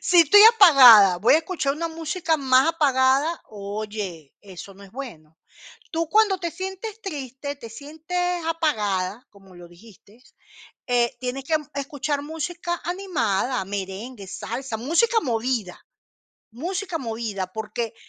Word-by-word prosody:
si 350 -1 +4
estoy 335 +6 +6
apagada, 245 - +8
¿voy 220 +9 +4
a - - +5
escuchar 320 -5 -2
una 335 +2 -3
música 325 +1 -2
más 265 +1 +3
apagada? 280 +1 +1
Oye, 205 -6 -6
eso 195 0 -11
no 200 - -16
es 200 - -14
bueno. 170 - -10 0.5
Tú, 330 0 -2
cuando 420 0 +3
te 345 -2 -4
sientes 385 +5 -7
triste, 285 - -6
te 230 -5 -11
sientes 325 +7 -4
apagada, 215 - -1
como 195 -2 -19
lo 175 0 -13
dijiste, 210 +5 -19 0.7
eh, 240 -1 +1
tienes 255 +2 -4
que 315 +4 0 0.2
escuchar 285 +1 -3
música 345 +3 -5
animada, 265 - -1
merengue, 200 +3 -7
salsa, 235 +4 -5
música 340 - +1
movida, 230 - -3 0.7
música 355 - -4
movida, 225 -7 -4
porque 220 +2 -5
265 Hz, 130 wpm, -23 LUFS, 215-330 Hz, 0.7 s, apagada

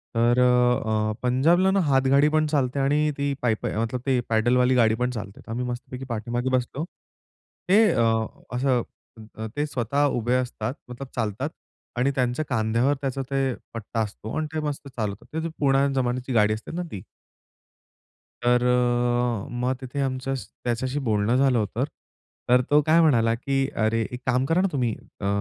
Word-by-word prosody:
तर 120 +2 +3
अ, 125 -3 +2
पंजाबला 165 +10 +3
ना 195 - +2
हातगाडी 135 +2 +4
पण 155 0 +2
चालते 140 -3 0
आणि 150 +2 +2
ती 140 0 0
पायीपा 115 -3 0
आहे 115 +3 -2
ते 130 -2 +2
पॅडलवाली 125 +3 +3
गाडी 110 -3 +4
पण 125 +2 0
चालते, 105 -4 -7
तर - - -10
आम्ही 125 +2 -2
मस्तपैकी 125 +1 -6
पाठीमागे 120 +3 -2
बसलो 130 +4 -4 0.9
ते 205 +4 +6 0.7
असं 125 -1 +2 0.6
अ, 110 - -4
ते 145 +1 0
स्वतः 140 +1 0
उभे 120 +2 +1
असतात 125 -2 -2 0.2
मतलब 125 +2 -7
चालतात 115 +4 -2 0.5
आणि 130 +3 +2
त्यांच्या 130 +4 0
खांद्यावर 115 +3 +1
त्याचा 135 0 -2
ते 135 -1 +1 0.2
पट्टा 115 0 -5
असतो. 110 +1 -5
आणि 155 - -1
ते 155 - -1
मस्त 140 -1 -5
चालवतात. 110 -6 -4 0.2
ते 165 - -2
पुराण्या 140 -1 +3
जमान्याची 125 +1 -2
गाडी 105 -2 +4
असते 110 - -7
ना 180 - -2
ती. 95 - -6 1.4
तर 120 0 +3
अ, 120 -2 +1
मग 125 +1 -1
तिथे 130 +2 -5
आमचं 135 0 -1 0.3
त्याच्याशी 130 +3 -1
बोलणं 110 -2 +1
झालं 130 -2 +3
होतं. 105 -3 -1 0.6
तर 125 +1 +5
तो 150 - +6
काय 160 +2 +5
म्हणाला 115 -8 +4
की 135 +2 0 0.2
"अरे, 115 +1 +1
एक 125 0 -6
काम 125 +1 +2
करा 165 +5 +2
ना 195 - +2
तुम्ही, 125 -6 0 0.3
अ, 100 - -2
125 Hz, 165 wpm, -25 LUFS, 115-135 Hz, 1.4 s, ते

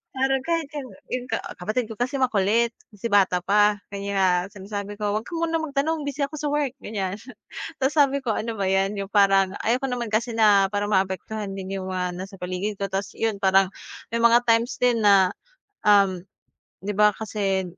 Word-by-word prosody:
parang 265 0 +1
kahit 330 -3 0
'yung 265 -3 -6 0.2
'yung 250 0 -3
ka - - 0 0.2
kapatid 215 +6 -2
ko 225 - -7
kasi 255 +3 -1
makulit, 230 -1 +2 0.2
kasi 205 +3 -4
bata 190 -3 +3
pa, 205 +2 +3
kaya 195 -3 +1
sinasabi 200 +1 -6
ko, 205 -1 0
"huwag 220 - -5
ka - - -10
munang 330 -1 0
magtanong 295 +1 -1
busy 285 0 -4
ako 290 - -9
sa 300 - -2
work," 290 -4 0
ganiyan. 195 -2 -3 0.6
Tapos 265 +3 +1
sabi 280 -1 +4
ko 255 - -4
ano 230 +2 -3
ba 200 - -1
'yan, 195 +1 +1
'yung 195 -1 -4
parang 195 -2 +4
ayoko 245 +4 +1
naman 240 -2 -3
kasi 230 +2 0
na 205 -3 +5
parang 205 0 -1
maapektuhan 195 +2 -1
din 190 0 -5
'yung 190 0 -5
mga 180 -1 -2
nasa 195 +2 -7
paligid 185 +3 -3
ko, - - +1
tas 195 +1 -3
'yun 225 -2 0
parang 190 -1 +4 0.4
may 230 - 0
mga 235 +1 +6
times 230 +2 +2
din 245 -2 +3
na, 195 -2 +5 0.5
um, 200 -3 +4 0.6
di 205 - -2
ba 210 +1 +5
kasi 200 -3 -1
210 Hz, 190 wpm, -24 LUFS, 195-245 Hz, 0.6 s, mga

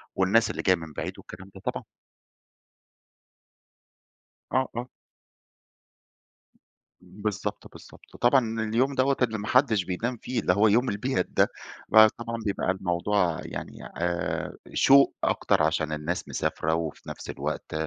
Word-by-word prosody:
والناس 105 +4 +3
اللي - - -4
جايه 95 - +4
من 80 -3 -9
بعيد، - - -4
والكلام 95 +2 -12
ده 95 - -11
طبعًا. - - -3 2.7
آه، 130 0 +1
آه. 120 +2 -4 2.1
بالضبط، 105 0 -5
بالضبط - - -16
وطبعًا 120 -3 +2
اليوم 120 +6 +1
دوّة 135 +1 +2
اللي 115 -3 +1
ما 105 - -6
حدش 115 -7 +3
بينام 115 +7 -3
فيه، 125 +1 -3
اللي 90 - +2
هو 105 +3 +4
يوم 120 +5 +3
البيات 125 +7 -1
ده، - - +3 0.4
فطبعًا 115 +2 +5
بيبقى 100 -2 0
الموضوع 90 -1 0
يعني، - - -7
آآ، 85 0 -2 0.2
شوق 140 0 +5
أكتر - - +2
عشان 80 0 0
الناس 75 +4 -3
مسافرة، 80 +1 -1
وفي 80 -2 -5
نفس - - -8
الوقت - - -4
105 Hz, 130 wpm, -26 LUFS, 90-120 Hz, 2.7 s, فطبعًا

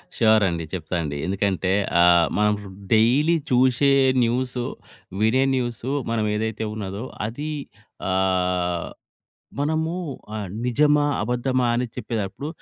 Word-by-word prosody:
Sure 110 -2 +4
అండి. 85 -1 -3
చెప్తా‌ 85 -1 -4
అండీ 70 -1 -4
ఎందుకంటే 95 0 0 0.3
ఆహ్, 85 -1 +6
మనం 105 0 +3 0.4
డైలీ 135 +10 +4 0.2
చూసే 130 +2 +4 0.3
న్యూస్, 125 +2 -1 0.6
వినే 120 +5 +3
న్యూస్, 120 -3 -2 0.3
మనం 110 -2 0
ఏదైతే 110 0 -2
ఉన్నదో 100 +1 -5 0.2
అది 145 +7 -5 0.6
ఆహ్, 90 -2 0 0.7
మనము 160 +3 0 0.4
ఆహ్, 105 -3 -4 0.2
నిజమా? 145 +4 +3 0.2
అబద్దమా? 125 +2 0
అని 125 +1 0
చెప్పేదప్పుడు 115 +2 -4
110 Hz, 110 wpm, -23 LUFS, 95-130 Hz, 0.7 s, ఆహ్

